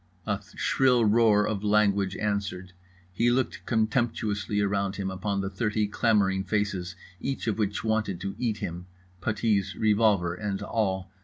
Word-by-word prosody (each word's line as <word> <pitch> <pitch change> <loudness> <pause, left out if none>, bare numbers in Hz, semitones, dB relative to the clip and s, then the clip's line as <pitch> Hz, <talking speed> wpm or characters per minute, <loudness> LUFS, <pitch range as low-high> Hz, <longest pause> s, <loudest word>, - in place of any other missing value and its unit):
A 105 -1 -1
shrill 125 -3 +3
roar 105 -1 +4
of 105 -2 -2
language 100 -2 +2
answered. 100 -3 -3 0.4
He 115 +6 +2
looked 125 +1 0
contemptuously 110 -3 0
around 100 -1 0
him, 95 -1 -3
upon 100 +1 -2
the 95 - -3
thirty 105 +1 0
clamouring 100 -3 +2
faces 100 -3 -2 0.2
each 135 0 -3
of 110 -1 -1
which 105 -1 -1
wanted 110 -5 0
to 100 +1 -3
eat 115 -4 0
him—puttees, 95 +3 -3
revolver 105 -5 +3
and 100 +1 -3
all. 95 -4 -1
105 Hz, 140 wpm, -27 LUFS, 95-110 Hz, 0.4 s, roar